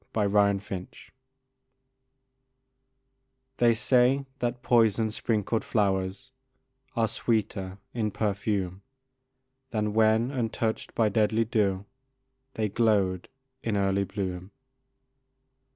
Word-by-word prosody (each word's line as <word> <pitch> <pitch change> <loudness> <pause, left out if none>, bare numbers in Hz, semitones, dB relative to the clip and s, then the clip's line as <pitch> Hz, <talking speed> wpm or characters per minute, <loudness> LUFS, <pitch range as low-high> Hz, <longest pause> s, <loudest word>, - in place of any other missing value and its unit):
A 105 -2 +2
Fragment 100 -2 0 2.6
They 120 -1 +4
say 130 +4 +3
that 125 0 -2
poison 115 -2 +3
sprinkled 110 0 -1
flowers 100 +4 -1 0.6
Are 115 -2 +2
sweeter 100 -4 -2 0.2
in 110 -3 -1
perfume 100 -2 -2 0.9
Than 105 -2 -1
when, 110 +3 +3
untouched 115 -3 -2
by 110 -2 +3
deadly 110 +2 +2
dew, 100 -3 0 0.7
They 110 -1 0
glowed 100 -4 +1 0.3
in 110 -3 -1
early 100 0 +1
bloom. 95 -2 -4
105 Hz, 90 wpm, -27 LUFS, 100-115 Hz, 2.6 s, They